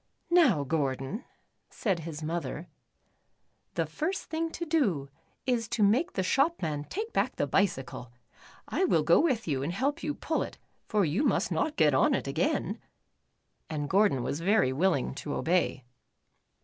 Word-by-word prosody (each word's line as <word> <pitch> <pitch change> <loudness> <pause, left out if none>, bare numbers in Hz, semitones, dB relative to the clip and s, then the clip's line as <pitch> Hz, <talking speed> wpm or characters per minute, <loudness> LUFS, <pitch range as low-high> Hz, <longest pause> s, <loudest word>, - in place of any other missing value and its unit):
"Now, 265 - +5
Gordon," 140 - -2 0.4
said 195 -6 -1
his 160 -1 -6
mother, 165 0 -3 1.1
"the - - +1
first 380 +1 -3
thing 325 +1 -1
to 340 - -4
do 210 - +1 0.4
is 240 -4 0
to 230 -2 0
make 250 - +3
the 190 - 0
shop 275 - +2
man 150 -3 -2
take 435 - -5
back - - +1
the - - 0
bicycle. 135 - -1 0.6
I - - 0
will 165 - +3
go 165 +3 +5
with 260 - +1
you 140 -4 0
and 145 +5 -2
help 275 - -1
you 295 -1 -2
pull 320 - -1
it, - - -5 0.3
for 210 -4 +2
you 160 - 0
must - - +1
not 305 - 0
get 150 -3 +4
on 130 - +4
it - - -2
again," 160 - -1 0.9
and 150 -2 -3
Gordon 190 - +3
was 145 - -2
very 190 -6 +3
willing 160 -2 +1
to 145 +1 -5
obey. 175 -6 +1
185 Hz, 160 wpm, -29 LUFS, -, 1.1 s, Now